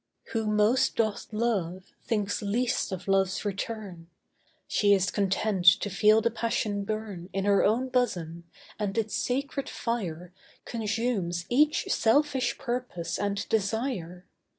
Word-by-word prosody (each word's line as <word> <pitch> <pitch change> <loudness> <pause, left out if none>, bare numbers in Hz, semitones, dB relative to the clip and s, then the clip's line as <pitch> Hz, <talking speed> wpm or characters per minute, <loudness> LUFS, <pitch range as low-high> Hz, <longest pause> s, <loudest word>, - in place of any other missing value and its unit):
ESTHER 225 - -2
Who 220 - -2
most 210 +4 +3
doth 220 -2 0
love 195 -5 -2
thinks 205 -3 -1
least 230 +4 0
of 190 +1 -6
love's 195 0 +1
return; 195 -4 -5 0.6
She 205 -1 +4
is 195 0 0
content 195 -1 0 0.2
to 205 - -3
feel 215 +3 +5
the 235 +2 +1
passion 220 -3 -1
burn 205 -4 -5
In 195 +1 -1
her 200 -1 +4
own 235 +5 +2
bosom, 175 -10 -1 0.3
and 205 -1 -2
its 220 -1 -1
sacred 275 +2 -2
fire 180 -7 -4 0.3
Consumes 215 -6 -2
each 300 +5 +3
selfish 260 +1 +2
purpose 240 -10 -3
and 200 0 -2
desire. 200 -5 -2
210 Hz, 130 wpm, -28 LUFS, 190-235 Hz, 0.6 s, feel